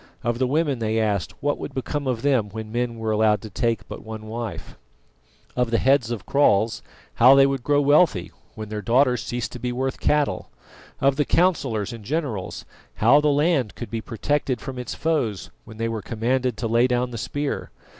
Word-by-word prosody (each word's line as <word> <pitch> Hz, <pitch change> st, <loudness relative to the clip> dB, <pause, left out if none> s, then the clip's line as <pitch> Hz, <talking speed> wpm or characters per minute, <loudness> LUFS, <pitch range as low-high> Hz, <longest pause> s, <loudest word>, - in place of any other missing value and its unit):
Of 120 Hz, 0 st, -1 dB
the 130 Hz, -, +2 dB
women 145 Hz, -2 st, 0 dB
they 110 Hz, 0 st, 0 dB
asked 105 Hz, -5 st, -1 dB
what 145 Hz, 0 st, 0 dB
would -, -, -7 dB
become 140 Hz, +2 st, -3 dB
of 120 Hz, -3 st, -2 dB
them 130 Hz, -7 st, +2 dB
when 110 Hz, +1 st, -7 dB
men 120 Hz, 0 st, -2 dB
were 110 Hz, -1 st, -2 dB
allowed 105 Hz, -1 st, +3 dB
to 110 Hz, -, -8 dB
take 115 Hz, -1 st, -1 dB
but -, -, -8 dB
one 110 Hz, -1 st, -8 dB
wife? 115 Hz, 0 st, -6 dB, 0.8 s
Of 125 Hz, -1 st, +1 dB
the 115 Hz, -, +2 dB
heads 135 Hz, -3 st, +3 dB
of 115 Hz, -5 st, -4 dB
kraals, 110 Hz, -6 st, +2 dB, 0.3 s
how 130 Hz, +3 st, +7 dB
they 135 Hz, 0 st, +7 dB
would 135 Hz, -1 st, -1 dB
grow 145 Hz, +3 st, +2 dB
wealthy 145 Hz, -, +3 dB, 0.2 s
when 110 Hz, -1 st, -7 dB
their 105 Hz, -1 st, -4 dB
daughters 125 Hz, +3 st, +3 dB
ceased 120 Hz, -1 st, -4 dB
to 125 Hz, -, -8 dB
be 125 Hz, +1 st, -2 dB
worth 130 Hz, +2 st, -2 dB
cattle? 150 Hz, -1 st, 0 dB, 0.5 s
Of 135 Hz, 0 st, +2 dB
the 150 Hz, -, +3 dB
councillors 135 Hz, -, +1 dB
and 115 Hz, -2 st, -9 dB
generals, 130 Hz, -, -3 dB, 0.3 s
how 130 Hz, +7 st, +5 dB
the 150 Hz, -, +1 dB
land 145 Hz, -, +1 dB
could 120 Hz, -, -7 dB
be 115 Hz, -1 st, -3 dB
protected 130 Hz, +2 st, -1 dB
from 130 Hz, -2 st, -7 dB
its 125 Hz, -, -5 dB
foes 130 Hz, -, -1 dB
when 110 Hz, -, -12 dB
they 115 Hz, 0 st, -1 dB
were 115 Hz, -2 st, -3 dB
commanded 120 Hz, +2 st, -1 dB
to 115 Hz, -, -2 dB
lay 115 Hz, +2 st, +3 dB
down 125 Hz, 0 st, 0 dB
the 115 Hz, -, -5 dB
spear? 145 Hz, +5 st, -3 dB
120 Hz, 200 wpm, -23 LUFS, 110-140 Hz, 0.8 s, how